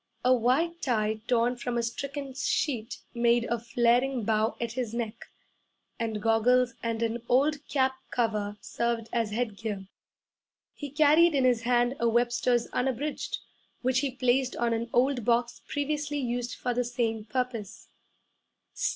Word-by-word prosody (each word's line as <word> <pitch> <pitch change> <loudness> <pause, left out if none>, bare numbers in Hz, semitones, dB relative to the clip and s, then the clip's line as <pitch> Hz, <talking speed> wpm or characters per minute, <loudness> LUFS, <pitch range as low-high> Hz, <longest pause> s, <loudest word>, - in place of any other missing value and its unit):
A 255 - +6
white 280 +9 +1
tie 220 -5 0
torn 245 0 +2
from 240 0 -3
a 235 - +1
stricken 275 +3 -4
sheet 260 -3 -1 0.2
made 235 0 +3
a 235 0 -1
flaring 240 +2 +2
bow 215 +1 +1
at 235 -1 -2
his 235 -2 -3
neck, 230 -1 -4 0.7
and 225 -2 -2
goggles 235 +2 +3
and 230 0 -1
an 230 +1 -1
old 285 +4 +3
cap 265 -2 +2 0.2
cover 210 -3 -1
served 235 -1 -2
as 230 -2 +1
headgear. 215 -3 -3 0.9
He 290 - -7
carried 305 +3 +5
in 270 - +3
his 245 -3 +3
hand 245 +2 +2
a 235 - +2
Webster's 240 0 +2
Unabridged, 265 +3 -1 0.5
which 255 0 +2
he 280 0 0
placed 255 0 +1
on 235 -1 +1
an 230 +1 -2
old 250 0 +2
box 240 +1 +1
previously 290 0 -2
used 245 -2 -2
for 245 - -2
the 245 +1 +1
same 230 -3 -2
purpose. 235 -3 -4
240 Hz, 145 wpm, -28 LUFS, 230-260 Hz, 0.9 s, A